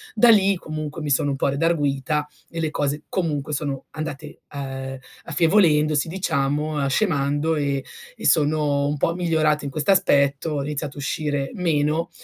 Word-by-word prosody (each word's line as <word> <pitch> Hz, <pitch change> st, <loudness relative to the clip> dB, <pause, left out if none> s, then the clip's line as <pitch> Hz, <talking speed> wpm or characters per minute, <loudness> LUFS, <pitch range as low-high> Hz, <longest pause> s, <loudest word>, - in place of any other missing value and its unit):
Da 240 Hz, -, +5 dB
lì 200 Hz, -3 st, +5 dB
comunque 155 Hz, -2 st, -6 dB
mi 150 Hz, -, -3 dB
sono 140 Hz, +1 st, +3 dB
un -, -, -1 dB
po' -, -, 0 dB
redarguita 145 Hz, -1 st, 0 dB, 0.2 s
e 165 Hz, -, -6 dB
le 160 Hz, -, 0 dB
cose 145 Hz, +1 st, -1 dB
comunque 150 Hz, -5 st, -2 dB
sono 140 Hz, -2 st, -3 dB
andate, 155 Hz, -3 st, -7 dB
ehm, 135 Hz, -1 st, -5 dB, 0.3 s
affievolendosi, 155 Hz, -4 st, +3 dB
diciamo, 155 Hz, -4 st, -1 dB
uhm, 140 Hz, -, 0 dB
scemando 145 Hz, -2 st, +1 dB
e 140 Hz, -2 st, -1 dB, 0.3 s
e -, -, -8 dB
sono 145 Hz, -2 st, +3 dB
un 145 Hz, -, -2 dB
po' 165 Hz, -, +1 dB
migliorata 155 Hz, -4 st, +1 dB
in 140 Hz, -, -4 dB
questo 155 Hz, +6 st, +2 dB
aspetto, 140 Hz, -4 st, +3 dB
ho 145 Hz, -2 st, -2 dB
iniziato 145 Hz, 0 st, -4 dB
a -, -, -6 dB
uscire 145 Hz, -1 st, -2 dB
meno, 160 Hz, -1 st, 0 dB
150 Hz, 160 wpm, -22 LUFS, 140-160 Hz, 0.3 s, Da